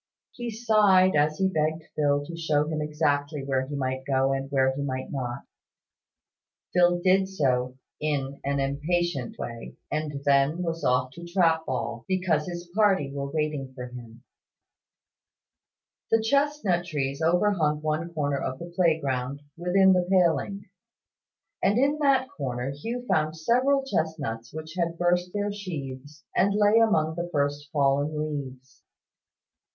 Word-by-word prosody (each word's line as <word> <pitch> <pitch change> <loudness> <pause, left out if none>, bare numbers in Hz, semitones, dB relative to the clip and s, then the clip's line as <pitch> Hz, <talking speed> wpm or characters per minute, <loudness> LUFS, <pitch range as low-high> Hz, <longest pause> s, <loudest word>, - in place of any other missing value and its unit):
He 240 -1 -5
sighed 210 -5 +4
as 150 +1 +2
he 190 - +2
begged 160 -2 -1
Phil 145 -1 +1
to 170 - -7
show 150 -3 +1
him 155 -1 -2
exactly 150 -1 -1
where 130 -1 -1
he 145 - -5
might 130 -1 -2
go 135 0 +1
and 135 0 -3
where 130 -1 +2
he 140 - -3
might 130 -2 -4
not 125 -3 -4 1.3
Phil 175 -1 +4
did 190 +2 +3
so 130 -7 0 0.2
in 140 -2 -2
an 140 0 0
impatient 145 0 -1
way, 115 -1 -7 0.2
and 150 -2 -3
then 140 +5 +3
was 165 -1 -3
off 125 0 +2
to 170 +6 -11
trap 165 -3 +2
ball, 120 -2 -3
because 180 -5 0
his 175 0 -6
party 195 -10 +3
were 140 0 -3
waiting 150 -3 -3
for 125 -1 -6
him. 120 -1 -11 1.9
The 225 - +4
chestnut 280 -8 +1
trees 140 -3 -3
overhung 165 -3 +2
one 155 +2 -1
corner 145 -4 -1
of 130 -1 -3
the 170 +4 -9
playground, 140 -6 0
within 190 +2 +4
the 180 -1 +1
paling: 180 +1 +2 1.0
and 200 +3 +3
in 285 +4 +2
that 275 -3 +3
corner 130 - -4
Hugh 230 - -5
found 155 -3 +1
several 260 - +2
chestnuts 145 - -2
which 155 0 -7
had 170 -2 -1
burst 175 +1 +1
their 205 +1 -1
sheaths, 145 -7 -7
and 200 +1 +3
lay 210 +2 +5
among 160 -9 +3
the 175 +1 -4
first 145 -1 -1
fallen 145 +1 +1
leaves. 135 -4 -6
155 Hz, 145 wpm, -26 LUFS, 140-180 Hz, 1.9 s, lay